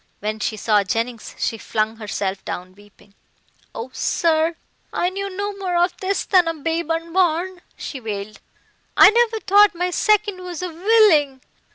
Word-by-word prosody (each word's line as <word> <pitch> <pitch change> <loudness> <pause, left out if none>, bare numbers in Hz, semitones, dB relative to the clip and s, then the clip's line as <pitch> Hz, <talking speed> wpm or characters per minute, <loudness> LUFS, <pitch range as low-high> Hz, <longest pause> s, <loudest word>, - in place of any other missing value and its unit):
When 215 +1 -3
she 215 +1 -2
saw 210 -1 +2
Jennings 230 +3 -3
she 225 - -2
flung 220 +1 -2
herself 200 -3 -4
down 185 +1 -6
weeping. 205 0 -21 0.6
"Oh, 240 +3 -6
sir, 325 +2 +1 0.4
I 355 - 0
knew 395 +1 -4
no 400 +2 -4
more 370 -2 -3
of 350 +1 +2
this 390 +1 -2
than 365 -3 +4
a 330 - -1
babe 325 +2 -3
unborn," 340 +2 0 0.2
she 275 - -6
wailed, 215 -2 -6 0.6
"I - - +9
never 460 -1 +2
thought 410 -1 +5
my 360 +1 -1
second 415 -1 +1
was 360 -1 -6
a 365 - -3
villing. 335 - +3
330 Hz, 160 wpm, -21 LUFS, 225-375 Hz, 0.6 s, I